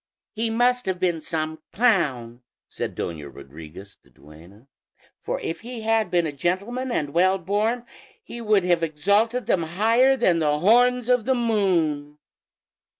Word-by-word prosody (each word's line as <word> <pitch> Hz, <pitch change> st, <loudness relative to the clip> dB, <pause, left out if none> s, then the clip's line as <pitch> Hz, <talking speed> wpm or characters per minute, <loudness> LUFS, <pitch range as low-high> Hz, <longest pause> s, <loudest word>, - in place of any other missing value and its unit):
"He 225 Hz, +1 st, -2 dB
must 245 Hz, +1 st, +1 dB
have 185 Hz, -1 st, -2 dB
been 175 Hz, -3 st, 0 dB
some 155 Hz, 0 st, -4 dB
clown," 140 Hz, -, 0 dB, 0.3 s
said -, -, -5 dB
Doña 75 Hz, -4 st, -5 dB
Rodriguez, 80 Hz, +7 st, -12 dB
the -, -, -27 dB
duenna; 85 Hz, -, -17 dB, 0.5 s
"for -, -, -4 dB
if 165 Hz, -, -5 dB
he 240 Hz, 0 st, -8 dB
had 225 Hz, 0 st, +1 dB
been 175 Hz, -1 st, +1 dB
a 155 Hz, -, -2 dB
gentleman 200 Hz, -, -2 dB
and 145 Hz, -10 st, -2 dB
well 185 Hz, +3 st, +3 dB
born 210 Hz, +6 st, -1 dB, 0.4 s
he 235 Hz, -, -9 dB
would 210 Hz, -4 st, +2 dB
have 175 Hz, -2 st, +1 dB
exalted 200 Hz, +10 st, +1 dB
them 185 Hz, -, +1 dB
higher 225 Hz, +11 st, +2 dB
than 175 Hz, -8 st, +2 dB
the 150 Hz, -2 st, +1 dB
horns 245 Hz, +7 st, +3 dB
of 250 Hz, -3 st, +2 dB
the 265 Hz, -, +2 dB
moon." 170 Hz, -11 st, 0 dB
185 Hz, 150 wpm, -23 LUFS, 150-230 Hz, 0.5 s, well